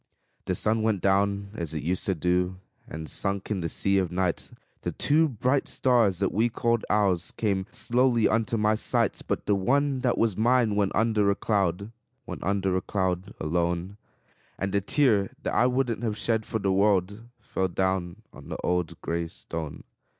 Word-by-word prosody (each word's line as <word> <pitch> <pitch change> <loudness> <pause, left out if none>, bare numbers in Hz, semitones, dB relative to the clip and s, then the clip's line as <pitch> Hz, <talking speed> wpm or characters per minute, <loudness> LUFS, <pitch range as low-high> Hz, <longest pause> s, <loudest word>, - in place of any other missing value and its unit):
The - - -1
sun 110 +1 +1
went 110 -3 +1
down 100 +1 +1
as 85 -6 -5
it 75 - -3
used 90 +4 -1
to 95 - +1
do, 90 +2 0 0.3
And 80 0 -7
sunk 100 +4 -3
in 100 - 0
the 85 - -2
sea 100 +4 +1
of 90 -3 -1
night; 90 -1 -1 0.3
The - - -3
two 155 +2 +3
bright 130 +3 0
stars 115 -8 +2
that 95 +1 0
we 115 +3 +2
called 115 0 0
ours 95 -4 +2
Came 100 -4 -1
slowly 120 -1 +2
unto 115 0 0
my 105 0 +3
sight; 110 - 0
But - - -2
the 105 - +2
one 135 +7 +1
that 125 -1 +1
was 115 -4 +2
mine 115 0 +3
went 100 -2 +1
under 105 -2 +2
a 100 - +2
cloud 100 -1 0 0.3
Went - - -7
under 95 -1 0
a 95 - +1
cloud, 95 0 -2
alone; 85 +4 -1 0.6
And 100 0 -3
a 100 - +2
tear 105 -3 +2
that - - -2
I 125 - +4
wouldn't 125 -3 0
have 110 -3 -2
shed 110 -2 -1
for 115 - -1
the 100 -3 0
world, 100 +1 +2 0.2
Fell 95 - -2
down 95 +2 -2
on - - -12
the - - -4
old 90 -2 -1
gray 85 0 -2
stone. 80 -2 -7
100 Hz, 185 wpm, -27 LUFS, 90-115 Hz, 0.6 s, I